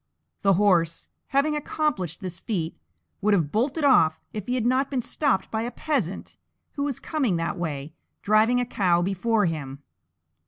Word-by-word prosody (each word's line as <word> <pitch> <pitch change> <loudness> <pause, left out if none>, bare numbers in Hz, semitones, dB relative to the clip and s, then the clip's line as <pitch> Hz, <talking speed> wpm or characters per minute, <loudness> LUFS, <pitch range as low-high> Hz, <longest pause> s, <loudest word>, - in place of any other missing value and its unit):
The 195 -1 +4
horse, 175 -4 +2 0.2
having 280 +2 +1
accomplished 290 - -2
this 185 -2 -5
feat, 175 -8 -3 0.5
would 210 0 +4
have 160 -6 0
bolted 265 +8 0
off 165 - +5
if 210 -2 -5
he 250 - 0
had 240 -3 -1
not 260 +3 +2
been 270 - -1
stopped 255 -3 0
by 220 - -1
a 235 - -2
Peasant 250 - -3 0.3
who 285 - -5
was 280 -3 -2
coming 270 - 0
that 165 0 -1
way, 155 -4 -4 0.3
driving 220 +4 +4
a 245 - 0
cow 180 -7 +2
before 205 +3 +1
him. 145 -4 -4
210 Hz, 165 wpm, -25 LUFS, 170-255 Hz, 0.5 s, off